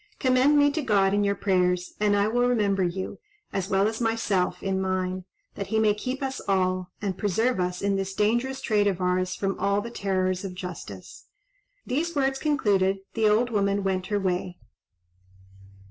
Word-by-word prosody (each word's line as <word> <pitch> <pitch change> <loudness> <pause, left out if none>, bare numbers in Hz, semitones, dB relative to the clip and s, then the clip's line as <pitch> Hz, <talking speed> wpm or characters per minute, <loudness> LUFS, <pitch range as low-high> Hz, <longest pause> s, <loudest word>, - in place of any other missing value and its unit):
Commend 260 +2 +4
me 290 0 +5
to 315 - -2
God 200 -6 +2
in 205 0 +2
your 200 0 +1
prayers, 180 -2 +1
and 205 -1 +3
I 205 0 +2
will 245 +2 +2
remember 205 -5 +1
you, 180 +2 -3 0.3
as 195 0 -2
well 195 +1 +3
as 220 +2 -3
myself, 225 -5 0
in 190 -1 0
mine, 185 -1 -2 0.3
that 200 - -5
he 220 - 0
may 215 -1 +4
keep 255 +6 -4
us 265 0 -3
all, 185 -2 +1
and 195 -2 -2
preserve 220 +3 +1
us 180 0 -2
in 200 -1 +1
this 195 0 -3
dangerous 240 +6 0
trade 210 -4 +2
of 190 -3 0
ours 185 0 0
from 195 -1 -2
all 200 0 +2
the 235 +3 -6
terrors 185 -3 -1
of 190 -2 -6
justice." 175 - -8 0.6
These 315 +6 -1
words 270 -1 +1
concluded, 200 -10 +2 0.2
the 220 -2 +3
old 235 +3 +2
woman 200 -1 +1
went 185 -1 -1
her 205 0 0
way. 180 -1 -2
200 Hz, 180 wpm, -26 LUFS, 185-225 Hz, 0.6 s, me